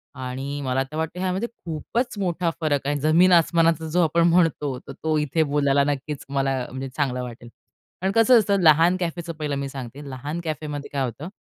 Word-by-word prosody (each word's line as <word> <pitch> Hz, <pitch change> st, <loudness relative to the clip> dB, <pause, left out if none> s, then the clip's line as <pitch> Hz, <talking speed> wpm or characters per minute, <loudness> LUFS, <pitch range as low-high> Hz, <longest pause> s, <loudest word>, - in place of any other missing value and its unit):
आणि 130 Hz, +3 st, -5 dB
मला 130 Hz, -1 st, 0 dB
तर 155 Hz, -, -5 dB
वाटतं 160 Hz, +3 st, -3 dB
ह्यामध्ये 190 Hz, +4 st, -1 dB
खूपच 225 Hz, -, -4 dB
मोठा 175 Hz, -2 st, 0 dB
फरक 145 Hz, -3 st, 0 dB
आहे. 145 Hz, -, +1 dB
जमीन 160 Hz, +5 st, +4 dB
आसमानाचा, 165 Hz, -1 st, +3 dB
जो 180 Hz, +3 st, +2 dB
आपण 165 Hz, +2 st, +3 dB
म्हणतो, 165 Hz, -6 st, +2 dB
तर 140 Hz, -, -11 dB
तो 155 Hz, -1 st, +1 dB
इथे 150 Hz, +2 st, +1 dB
बोलायला 140 Hz, -1 st, +2 dB
नक्कीच 145 Hz, +1 st, -5 dB
मला, 135 Hz, -1 st, 0 dB
म्हणजे 130 Hz, +1 st, -6 dB
चांगला 125 Hz, -4 st, 0 dB
वाटेल. 120 Hz, -1 st, -9 dB, 0.5 s
कारण 190 Hz, +1 st, +1 dB
कसं 230 Hz, +2 st, +6 dB
असतं? 200 Hz, -2 st, +1 dB
लहान 165 Hz, +3 st, +5 dB
कॅफेचं 170 Hz, -1 st, -3 dB
पहिलं 150 Hz, -2 st, -3 dB
मी 140 Hz, 0 st, -3 dB
सांगते, 135 Hz, +2 st, -8 dB
लहान 145 Hz, +5 st, -5 dB
कॅफेमध्ये 150 Hz, -2 st, -5 dB
काय 140 Hz, -2 st, 0 dB
होतं? 140 Hz, +7 st, -6 dB
155 Hz, 185 wpm, -24 LUFS, 140-170 Hz, 0.5 s, कसं